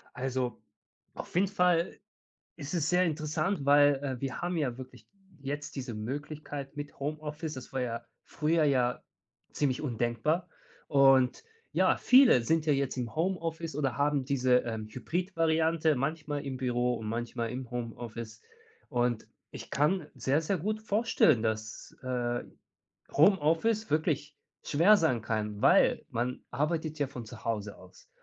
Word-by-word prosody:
Also, 130 -2 -2 0.5
auf - - -8
jeden 190 +2 +3
Fall 180 -3 +1 0.6
ist 145 +1 -7
es 160 -3 0
sehr 180 +1 +3
interessant, 155 +1 -1
weil, 145 0 +6
äh, 130 -3 -3
wir 135 -1 -3
haben 175 -1 -1
ja 125 -6 -1
wirklich 125 -3 -11 0.3
jetzt 145 +1 -5
diese 125 -4 -5
Möglichkeit 145 +4 -6
mit 145 0 -7
Homeoffice. 150 +2 -4
Das 130 -2 -9
war 130 - -1
ja 115 -1 -3 0.2
früher 160 +1 +1
ja 125 -4 +2 0.5
ziemlich 140 -2 0
undenkbar. 130 +7 -1 0.4
Und 135 - +4 0.3
ja, - - +3
viele 255 - +6
sind 160 +6 +1
ja 150 - +3
jetzt 135 -1 -1
im 120 -2 -3
Homeoffice 165 -2 -2
oder 145 -2 -1
haben 145 -1 +1
diese, 130 -2 +3
ähm, 110 -2 -4
Hybrid-Variante, 165 - +1
manchmal 145 +1 -3
im 130 -1 -4
Büro 125 -1 0
und 110 -1 -6
manchmal 115 0 -3
im 125 -1 -6
Homeoffice. 115 -1 -6 0.5
Und, 120 -2 0 0.2
ich - - -9
kann 150 +2 +1
sehr, 140 +4 +1
sehr 185 +4 -1
gut 215 +6 -2
vorstellen, 210 - +3
dass, 110 0 -4
äh, 120 -2 -2 0.7
Homeoffice 190 +6 +3
wirklich 155 -1 0 0.3
schwer 175 +9 +5
sein 145 - +1
kann, 105 -2 -3
weil - - +4
man 120 +2 -3
arbeitet 155 +1 -1
ja 145 - +1
von 125 -3 -8
zu 115 - -12
Hause 105 -3 -3
aus 95 0 -17
140 Hz, 145 wpm, -30 LUFS, 125-160 Hz, 0.7 s, weil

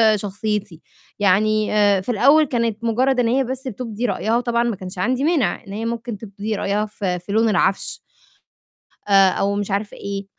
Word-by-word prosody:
شخصيتي، 205 -3 -4 0.4
يعني 210 +2 +2
آآ، 205 -2 +3
في 190 - -9
الأول 275 +8 +5
كانت 230 -4 -2
مُجرّد 250 +3 +2
إن 235 - +1
هي 265 +3 +2
بس 260 +1 -5
بتُبدي 230 0 -5
رأيها 225 +1 0
وطبعًا 235 -1 0
ما 235 -3 -1
كانش 185 +1 -9
عندي 250 +7 0
مانِع 285 - +1
إن 195 - -8
هي 220 +2 -4
ممكن 230 -1 -4
تُبدي 205 +1 -5
رأيها 205 +1 -1
ف 210 0 -13
في 180 +1 -3
لون 225 +1 +3
العَفش 195 -1 0 1.1
آآ، 195 -1 +6
أو 200 +2 0
مش 205 0 -3
عارفة 200 +1 -2
إيه، 200 0 -5
215 Hz, 180 wpm, -21 LUFS, 200-235 Hz, 1.1 s, آآ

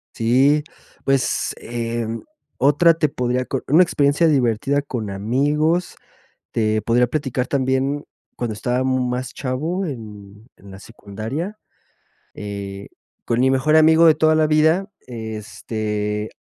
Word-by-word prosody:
Sí. 135 +6 +3 0.4
Pues, 135 -3 0
eh, 115 -1 -3 0.5
otra 145 +5 +5
te 155 -2 0
podría 125 -1 -1
co 135 - -3
una 160 +6 +6
experiencia 150 0 +2
divertida 135 0 +1
con 120 -7 -5
amigos, 145 - 0 0.6
te 110 -1 0
podría 120 +1 +3
platicar 130 -1 -2
también, 135 +1 0 0.3
cuando 120 -3 -3
estaba 125 +4 -1
más 130 -1 -1
chavo 155 +9 -3
en 105 - -9
en 100 - -15
la 95 - -11
secundaria, 115 - -6 0.8
eh, 100 -1 -7 0.4
con 115 - 0
mi 130 +1 +4
mejor 135 +4 +2
amigo 160 +1 +6
de 160 -2 +7
toda 155 0 +3
la 155 -1 +3
vida, 160 +6 +2 0.2
este, 110 -2 -4
130 Hz, 125 wpm, -21 LUFS, 110-150 Hz, 0.8 s, de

